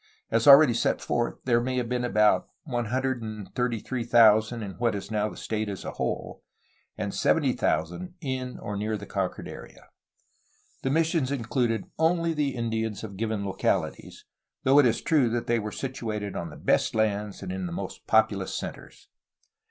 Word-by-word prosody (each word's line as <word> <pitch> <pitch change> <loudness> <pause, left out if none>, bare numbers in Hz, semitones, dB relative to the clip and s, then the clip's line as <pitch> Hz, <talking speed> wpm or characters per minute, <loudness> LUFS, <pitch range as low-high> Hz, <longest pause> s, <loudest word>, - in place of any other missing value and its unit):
As 115 +2 +2
already 140 -2 +9
set 115 - +1
forth, 120 -1 -1
there 120 -2 +3
may 130 +1 -2
have 125 -2 -1
been 125 +1 -1
about 105 -3 +3 0.2
133,000 120 -2 +1
in 100 - -5
what 120 -3 +1
is 100 +1 -6
now 105 0 0
the - - -11
state 110 -1 -3
as 100 -3 -6
a - - -3
whole, - - -4 0.6
and - - -3
70,000 90 - 0
in 130 -3 -4
or 105 - -5
near 105 +2 -2
the 100 - -8
conquered 95 -3 -3
area. - - -11 0.9
The 135 - -1
missions 160 -2 +1
included 115 -4 0 0.2
only 165 +1 +2
the 145 -3 -1
Indians 110 -3 -2
of 100 -3 -7
given 110 0 -2
localities, 95 - -2 0.4
though 135 +2 +6
it 140 - +6
is 115 - 0
true 145 -7 +3
that 120 +1 -2
they 120 0 +1
were 105 0 -4
situated 110 -6 -4
on 85 - -4
the 75 - -11
best - - +1
lands 105 -2 -1
and 185 - -5
in 190 -1 -3
the - - -6
most 175 - -6
populous - - +2
centres. - - -8
115 Hz, 165 wpm, -27 LUFS, 105-130 Hz, 0.9 s, already